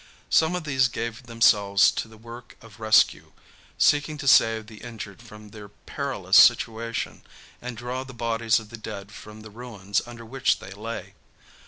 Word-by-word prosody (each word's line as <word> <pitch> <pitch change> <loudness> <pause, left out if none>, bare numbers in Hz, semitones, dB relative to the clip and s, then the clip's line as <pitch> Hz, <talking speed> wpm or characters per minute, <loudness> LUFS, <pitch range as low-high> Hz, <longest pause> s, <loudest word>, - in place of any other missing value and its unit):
Some 160 +2 +3
of 180 - -4
these 135 -4 +2
gave 120 0 -6
themselves 105 -4 +4
to - - -4
the 110 0 -16
work 115 +2 -12
of 110 -3 -16
rescue, 110 0 +3 0.4
seeking 145 +1 +2
to 140 -1 -6
save 115 -3 +4
the 105 -1 -14
injured 110 -5 -9
from 105 -3 -13
their 105 -1 -12
perilous - - -1
situation 115 0 +3 0.4
and 125 -1 -7
draw 125 +2 -4
the 135 - -11
bodies 115 -1 0
of 110 -1 -13
the 120 - -9
dead 100 -2 -8
from 105 +1 -12
the 110 0 -12
ruins 105 -4 -3
under 115 -1 -10
which 130 +3 0
they - - -11
lay. 100 -2 -7
115 Hz, 170 wpm, -25 LUFS, 105-120 Hz, 0.4 s, themselves